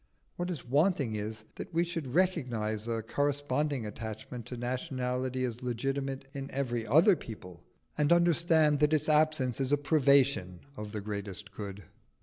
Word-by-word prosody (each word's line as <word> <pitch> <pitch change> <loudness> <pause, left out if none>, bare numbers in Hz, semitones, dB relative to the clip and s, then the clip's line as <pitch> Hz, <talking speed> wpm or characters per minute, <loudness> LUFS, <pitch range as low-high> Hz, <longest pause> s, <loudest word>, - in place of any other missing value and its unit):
What 175 +1 -3
is 165 -7 -4
wanting 140 - +2
is, 105 +1 -4
that - - -7
we 170 0 +2
should 165 -7 -4
recognise 120 - 0
a 115 -1 -1
corresponding 145 +1 0
attachment 110 +2 -6
to 125 - -5
nationality 130 0 -2
as 120 -1 -3
legitimate 135 +2 -2
in 135 0 -5
every 120 -4 -2
other 165 - +6
people, 90 - -10 0.4
and 150 +1 +3
understand 170 -3 +4
that 150 +1 +3
its 155 0 +2
absence 150 -5 +2
is 135 0 0
a 145 - +5
privation 140 - +3
of 105 -3 -6
the 105 -1 -4
greatest 100 -1 -5
good. 100 -1 -7
130 Hz, 150 wpm, -31 LUFS, 110-150 Hz, 0.4 s, other